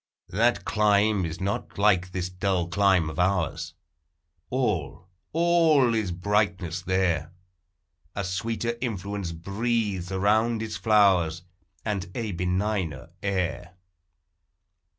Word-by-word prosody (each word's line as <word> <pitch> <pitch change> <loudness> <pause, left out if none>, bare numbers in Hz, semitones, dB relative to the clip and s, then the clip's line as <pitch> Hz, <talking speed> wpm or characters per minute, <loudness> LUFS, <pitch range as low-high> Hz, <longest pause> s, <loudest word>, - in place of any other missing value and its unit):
That 115 0 +1
clime 105 0 +2
is 80 +1 -7
not 100 +2 -3
like 95 -3 +3
this 90 -1 -2
dull 90 -1 -1
clime 95 -2 +3
of 75 - -5
ours; 90 -3 0 0.7
All, 95 - -1 0.2
all 165 -6 +4
is 110 -5 0
brightness 95 -2 0
there; 90 -4 0 0.8
A 100 - -2
sweeter 115 +5 -2
influence 100 -6 -3
breathes 100 +1 -2
around 110 +4 +2
its 110 - -5
flowers, 95 -7 +3 0.4
And 100 -4 -1
a 115 -4 -2
benigner 90 -4 -2
air. 90 -2 -2
100 Hz, 105 wpm, -26 LUFS, 90-110 Hz, 0.8 s, all